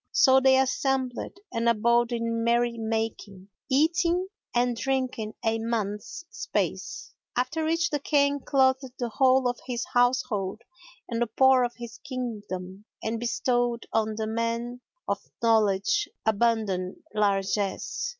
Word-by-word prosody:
So 265 0 +6
they 265 0 +5
assembled 265 +2 0 0.2
and 230 +1 +2
abode 235 +2 +3
in 230 -1 -1
merry 235 0 +2
making, 220 -4 -4 0.2
eating 340 +6 +2 0.2
and 245 0 +1
drinking 255 -4 -2
a 225 0 +1
month's 225 - -3
space, 425 -1 -3 0.2
after 305 +6 0
which 330 +2 +1
the 295 - 0
King 285 0 +2
clothed 265 -1 +1
the 240 -2 -2
whole 260 +2 +3
of 245 -1 -2
his 240 -2 -2
household 245 -5 +1 0.4
and 235 -1 -3
the 240 - +2
poor 260 +3 +5
of 240 -1 -2
his 235 -2 -9
Kingdom 210 -8 -6 0.2
and 225 +1 -2
bestowed 240 0 0
on 220 -1 +1
the 220 0 -2
men 230 +2 -2 0.3
of - - 0 0.2
knowledge 225 - +2 0.2
abundant 215 -4 +1 0.2
largesse. 200 - 0
235 Hz, 130 wpm, -27 LUFS, 220-265 Hz, 0.4 s, So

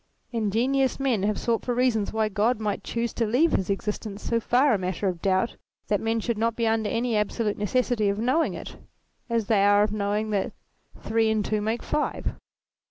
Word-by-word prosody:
Ingenious 245 +5 +1
men 260 -7 +1
have 205 0 0
sought 230 -1 0
for 245 - -1
reasons 240 -4 +1
why 220 0 +1
God 215 +3 +1
might 210 -2 -2
choose 235 0 -2
to 230 - 0
leave 270 +10 +3
his 190 - 0
existence 210 +1 -3
so 230 - +1
far 250 +4 +3
a - - +3
matter 185 +2 -2
of 175 -3 -2
doubt 190 +4 +1 0.3
that 205 - +1
men 225 0 0
should 225 -1 -2
not 230 0 +1
be 230 - 0
under 220 -1 +1
an 235 +1 -1
absolute 210 -1 0
necessity 220 0 +1
of 200 - -1
knowing 255 +9 +1
it, - - -8 0.5
as 230 -2 0
they 200 -2 +3
are 205 0 +5
of 210 - 0
knowing 210 +1 -1
that 200 -2 -1 0.5
three 225 0 +1
and 215 -2 +1
two 215 -1 0
make 220 +3 -2
five. 300 - -2
220 Hz, 200 wpm, -26 LUFS, 205-235 Hz, 0.5 s, are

